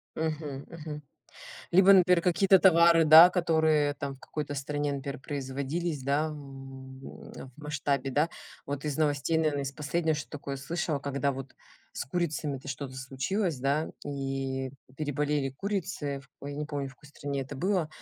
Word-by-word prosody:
Мгм, 155 -3 -3
мгм. 155 -3 -7 0.7
Либо, 190 +2 +7
например, 180 -2 +6
какие-то 185 +3 +4
товары, 170 -2 +6
да, 160 +3 +10
которые 160 -4 +2
там 140 -1 -5
в - - -23
какой-то 145 -2 -5
стране, 145 +1 -2
например, 140 0 -5
производились, 140 +3 -3
да, 140 +4 +1
м, 135 -3 -9
в 135 0 -10
масштабе, 145 -2 -2
да. 150 +5 +2 0.4
Вот 145 +1 -4
из 150 -3 -2
новостей, 150 +1 +1
наверное, 150 -3 +1
из 135 - -3
последнего, 155 +2 0
что 150 - -6
такое 140 -2 -6
слышала, 155 +2 -2
когда 140 0 -1
вот 135 0 -7 0.4
с - - -4
курицами-то 150 -3 -2
что-то 135 -1 -5
случилось, 135 +6 -2
да, 140 +4 0 0.2
и 135 -1 -3 0.3
переболели 145 -1 -1
курицы, 150 -4 -3 0.2
ой, 140 +1 -6
я 145 - -7
не 150 - -2
помню, 145 -2 -3
в 135 - -14
какой 150 - -17
стране 140 -1 -4
это 135 +2 -8
было, 180 +2 0
145 Hz, 155 wpm, -29 LUFS, 135-160 Hz, 0.7 s, да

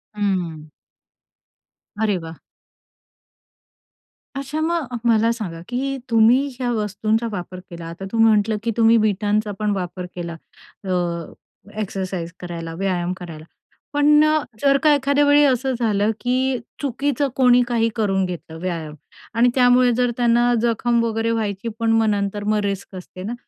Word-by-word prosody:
हं. 175 -7 -2 1.3
अरे 210 -3 +1
वाह! 160 0 -9 2.0
अच्छा. 275 +3 -4
मग 315 -7 -1
मला 230 0 +4
सांगा, 190 -8 -5
की 245 - -2
हे 275 +1 -2
तुम्ही 235 +4 +4
ज्या 250 -2 -3
वस्तूंचा 215 +1 -1
वापर 185 -2 -6
केला, 170 -2 -8
आता 170 +3 -8
तू 230 - -2
म्हटलं, 220 -1 +4
की 230 - 0
तुम्ही 230 0 +5
वीटांचा 210 0 +1
पण 210 -1 0
वापर 180 -1 -4
केला 170 -1 -5 0.5
अ, 195 - -6 0.9
एक्सरसाइज 185 -4 -4
करायला, 170 -2 -6
व्यायाम 180 0 -1
करायला. 165 -4 -9 0.5
पण 295 +1 +5
अ, 310 0 +3 0.2
जर 275 -1 +4
का 305 -1 +6
एखाद्या 285 +1 +2
वेळी 290 +1 +5
असं 265 -1 +2
झालं, 215 -2 +1
की 255 +1 0 0.2
चुकीचं 280 +1 0
कोणी 250 -1 +5
काही 230 -2 +1
करून 195 -4 +1
घेतलं 170 -3 -7
व्यायाम 165 -4 -4 0.4
आणि 240 +2 +5
त्यामुळे 250 -1 +5
जर 245 +1 +1
त्यांना 240 0 +3
जखम 235 0 +1
वगैरे 225 0 0
व्हायची, 215 -1 -2
पण 230 -1 +1
मग 225 0 +3
नंतर 205 0 -1
मग 210 +1 +1
रिस्क 200 -1 -4
असते 185 0 -9
ना? 215 +5 -4
225 Hz, 145 wpm, -21 LUFS, 190-245 Hz, 2.0 s, का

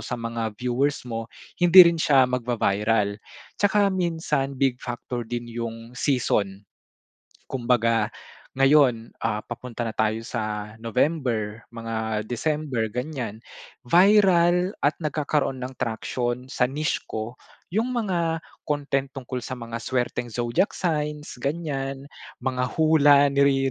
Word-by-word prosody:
sa 125 - -3
mga 115 -2 -4
viewers 125 +4 0
mo, 115 -1 -4 0.3
hindi 175 +1 +10
rin 170 -1 +2
siya 135 -4 +5
magva-viral. 110 -4 0 0.4
Tsaka 205 -1 +3
minsan 160 -6 -1
big 130 -2 +1
factor 120 0 -5
din 120 0 -3
yung 115 0 -6
season. 105 -8 0 0.8
Kumbaga 115 -3 +1 0.4
ngayon, 135 -4 +4
ah, 105 - -1
papunta 120 -1 -6
na 115 - -3
tayo 110 0 +1
sa 105 -3 -4
November, 115 -3 -1
mga 110 -2 -3
December 135 -2 -1
ganyan. 125 -4 -4 0.4
Viral 180 +2 +5
at 145 - +3
nagkakaroon 150 -3 -1
ng 130 +1 -5
traction 120 +2 -2
sa 130 - +1
niche 150 +3 -2
ko 110 +3 -5 0.3
yung 225 +7 -1
mga 175 -8 0 0.2
content 140 -2 -1
tungkol 130 -2 -5
sa - - -6
mga 115 -1 -6
swerteng 125 -1 -2
Zodiac 120 - 0
signs, 150 -4 -2
ganyan. 140 -3 -3 0.3
Mga 125 0 -1
hula 145 -3 +6
ni 140 -1 +3
130 Hz, 120 wpm, -25 LUFS, 115-150 Hz, 0.8 s, hindi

